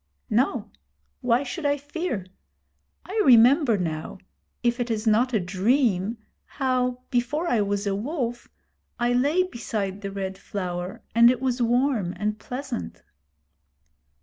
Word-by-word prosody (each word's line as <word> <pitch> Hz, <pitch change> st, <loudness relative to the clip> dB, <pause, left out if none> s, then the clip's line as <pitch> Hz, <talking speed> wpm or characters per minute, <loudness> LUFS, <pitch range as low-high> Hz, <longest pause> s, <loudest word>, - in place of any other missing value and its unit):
'No. 245 Hz, +6 st, +1 dB, 0.5 s
Why 245 Hz, 0 st, +2 dB
should 280 Hz, +5 st, -5 dB
I 285 Hz, 0 st, +2 dB
fear? 290 Hz, -, -4 dB, 0.8 s
I 425 Hz, +3 st, 0 dB
remember 250 Hz, -, +6 dB
now 160 Hz, -3 st, -4 dB, 0.5 s
if 240 Hz, +1 st, +1 dB
it 240 Hz, 0 st, -1 dB
is 220 Hz, -1 st, -2 dB
not 230 Hz, +4 st, +3 dB
a 220 Hz, -, +2 dB
dream 200 Hz, +2 st, +1 dB, 0.3 s
how, 250 Hz, -2 st, -1 dB
before 280 Hz, +7 st, 0 dB
I 235 Hz, -9 st, +2 dB
was 200 Hz, 0 st, -1 dB
a 200 Hz, -, 0 dB
Wolf, 240 Hz, -, -3 dB, 0.5 s
I 240 Hz, 0 st, +1 dB
lay 290 Hz, +9 st, +3 dB
beside 215 Hz, -, -4 dB
the 200 Hz, -, -4 dB
Red 190 Hz, -1 st, -5 dB
Flower, 180 Hz, -2 st, -5 dB
and 235 Hz, +2 st, +7 dB
it 250 Hz, -1 st, +1 dB
was 255 Hz, -1 st, -1 dB
warm 240 Hz, -6 st, +1 dB
and 210 Hz, 0 st, -2 dB
pleasant.' 245 Hz, -, -6 dB
240 Hz, 135 wpm, -25 LUFS, 200-260 Hz, 0.8 s, and